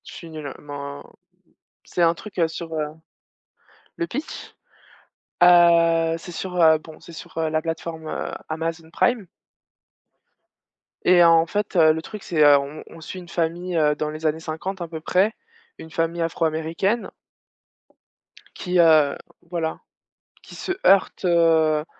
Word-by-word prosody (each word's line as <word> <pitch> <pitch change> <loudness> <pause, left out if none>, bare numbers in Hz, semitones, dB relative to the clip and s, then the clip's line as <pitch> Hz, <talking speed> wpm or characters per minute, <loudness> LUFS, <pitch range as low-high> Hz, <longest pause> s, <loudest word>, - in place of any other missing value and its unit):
Je - - -11
suis 170 - -10
nulle, 155 -3 -7
men 145 -1 -8 0.8
c'est 180 - -4
un 165 -1 +5
truc, 200 +2 -9
heu, 165 - +3
sur, 165 0 -7
heu 155 -1 -1 1.1
le 340 - -2
pitch? 295 +1 -7 0.9
Heu, 170 -2 +5
c'est 175 +2 -10
sur, 180 +1 -5
heu, 160 -1 +6
bon 155 0 -14
c'est 170 - -13
sur, 160 - -11
heu, 160 -1 0
la 155 0 0
plateforme, 165 0 -5
heu, - - -4 0.2
Amazon 165 0 -4
Prime 235 0 +1 1.8
et 175 -1 +6
en 165 -1 +5
fait, 205 +2 -3
heu, 160 -2 +6
le 160 - -4
truc 210 +4 -9
c'est, 155 -3 +1
heu, 145 -1 +7
on 140 +2 -7
on 165 - -13
suit 185 +4 -8
une 175 - -12
famille, 175 +2 -2
heu, 150 -2 +3
dans 150 +1 -3
les 155 +1 -7
années 155 +1 +1
50 170 +4 -5
un 170 - -4
peu 160 -1 -7
près, 190 +6 +2 0.5
une 160 - -10
famille 165 +1 -1
afro-américaine 165 +6 -1 1.4
qui, 180 -1 -1
heu, 155 -4 +5 0.3
voilà 165 -2 -3 0.6
qui - - -14
se 375 - -3
heurte, 195 0 +4
heu, 160 -3 +3
165 Hz, 155 wpm, -23 LUFS, 155-175 Hz, 1.8 s, heu